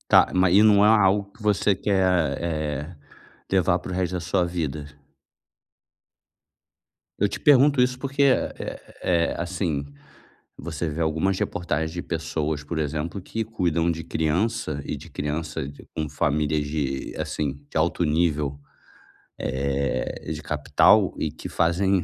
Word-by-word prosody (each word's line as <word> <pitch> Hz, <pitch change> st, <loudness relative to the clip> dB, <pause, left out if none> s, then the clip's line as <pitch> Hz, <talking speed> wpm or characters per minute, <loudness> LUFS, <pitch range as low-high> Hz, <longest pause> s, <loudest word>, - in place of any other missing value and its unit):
Está, -, -, +5 dB
mas, 90 Hz, 0 st, +4 dB
e 105 Hz, -, +7 dB
não 105 Hz, -1 st, +6 dB
é -, -, +6 dB
algo 100 Hz, -2 st, +4 dB
que 110 Hz, -, -16 dB
você 105 Hz, -1 st, +2 dB
quer, 90 Hz, -7 st, +1 dB
eh, 75 Hz, 0 st, -3 dB, 0.5 s
levar 90 Hz, -2 st, +3 dB
para 90 Hz, -, -7 dB
o -, -, -3 dB
resto 90 Hz, -1 st, -1 dB
da 90 Hz, -, -2 dB
sua 90 Hz, +1 st, +1 dB
vida? 80 Hz, -4 st, -3 dB, 2.3 s
Eu -, -, +2 dB
te -, -, -5 dB
pergunto 145 Hz, -1 st, +5 dB
isso 125 Hz, 0 st, +1 dB
porque 140 Hz, +1 st, -1 dB
é 135 Hz, -, +3 dB
é -, -, -6 dB, 0.2 s
é 85 Hz, -2 st, +1 dB
assim, 85 Hz, -5 st, -2 dB, 0.7 s
você 85 Hz, 0 st, -4 dB
vê 75 Hz, +2 st, -4 dB
algumas 80 Hz, +4 st, +1 dB
reportagens 80 Hz, -2 st, -2 dB
de 85 Hz, -, -4 dB
pessoas 80 Hz, -2 st, -2 dB
por 80 Hz, +2 st, -4 dB
exemplo 80 Hz, +5 st, -3 dB
que 110 Hz, +4 st, -4 dB
cuidam 85 Hz, -6 st, 0 dB
de 80 Hz, -1 st, -4 dB
criança 80 Hz, 0 st, -1 dB
e -, -, -3 dB
de -, -, -12 dB
criança 75 Hz, +1 st, -3 dB, 0.4 s
com 75 Hz, -1 st, -2 dB
famílias 75 Hz, +1 st, 0 dB
de 70 Hz, -3 st, -3 dB
assim, 70 Hz, -1 st, -3 dB
de -, -, -10 dB
alto 85 Hz, +2 st, +1 dB
nível, 75 Hz, -3 st, 0 dB, 0.8 s
eh, 70 Hz, +1 st, -2 dB
de -, -, -4 dB
capital -, -, +3 dB
e -, -, -1 dB
que -, -, -8 dB
fazem 90 Hz, +2 st, +2 dB
85 Hz, 145 wpm, -24 LUFS, 75-95 Hz, 2.3 s, e